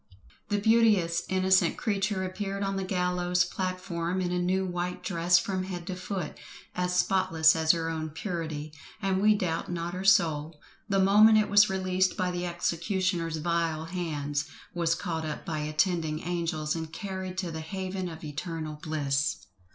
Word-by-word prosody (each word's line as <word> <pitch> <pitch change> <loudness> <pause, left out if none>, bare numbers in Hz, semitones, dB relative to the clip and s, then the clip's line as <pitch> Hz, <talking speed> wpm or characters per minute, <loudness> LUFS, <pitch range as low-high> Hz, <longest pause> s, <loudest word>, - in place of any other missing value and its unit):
The 205 - +1
beauteous 205 -6 +3
innocent 185 -2 +3
creature 200 -3 0
appeared 195 +1 -3
on 195 0 -1
the 195 - -2
gallows 180 -1 +1
platform 185 -1 -3
in 180 -1 -1
a 180 - 0
new 190 +2 +1
white 180 0 -3
dress 175 -1 +3
from 185 0 -1
head 175 -2 -6
to 185 - -4
foot, 180 -2 -5 0.3
as 180 0 -1
spotless 180 -3 +4
as 160 -1 -1
her 165 -1 -2
own 160 -1 -3
purity; 160 -3 -4 0.3
and 195 -2 0
we 210 +1 +5
doubt 170 -5 -2
not 170 0 -3
her 185 +1 -4
soul, 160 -5 +3 0.3
the 200 - +2
moment 210 +3 +6
it 215 -2 +2
was 205 +1 +7
released 185 -1 +1
by 180 -1 0
the 175 0 -3
executioner's 175 -1 -1
vile 165 -1 -1
hands, 150 -4 -2 0.3
was 165 -1 +1
caught 165 -4 -3
up 155 -1 -5
by 155 -2 -2
attending 155 +1 0
angels 165 -3 -2
and 160 -1 -5
carried 190 0 -5
to 180 -3 -2
the 160 0 -5
haven 185 +2 -4
of 160 -1 -10
eternal 155 0 -5
bliss. 145 -3 -1
180 Hz, 165 wpm, -28 LUFS, 165-190 Hz, 0.3 s, was